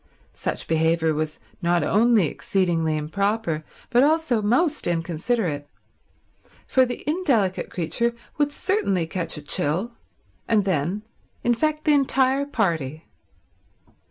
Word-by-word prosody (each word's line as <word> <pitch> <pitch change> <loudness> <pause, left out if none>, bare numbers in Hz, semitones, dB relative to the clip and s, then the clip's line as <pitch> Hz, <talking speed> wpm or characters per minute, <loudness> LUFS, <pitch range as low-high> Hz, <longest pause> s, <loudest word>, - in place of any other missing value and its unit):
Such - - -4
behaviour 160 0 +2
was 155 0 -2 0.2
not 175 0 +2
only 220 -2 +4
exceedingly 165 -2 0
improper 195 +1 -1 0.3
but 245 0 +5
also 300 -5 +2
most 265 - +1
inconsiderate, 165 -1 -1 1.0
for 260 -1 +3
the 245 +3 -6
indelicate 270 - +1
creature 235 +8 -1 0.2
would 290 0 +2
certainly 245 - 0
catch 165 -1 -3
a 150 - -8
chill, 165 +10 0 0.6
and 210 -3 +2
then 185 +3 -1 0.4
infect 305 +6 +1
the 305 - +5
entire 270 0 +2
party. 165 - -1
200 Hz, 110 wpm, -24 LUFS, 165-255 Hz, 1.0 s, but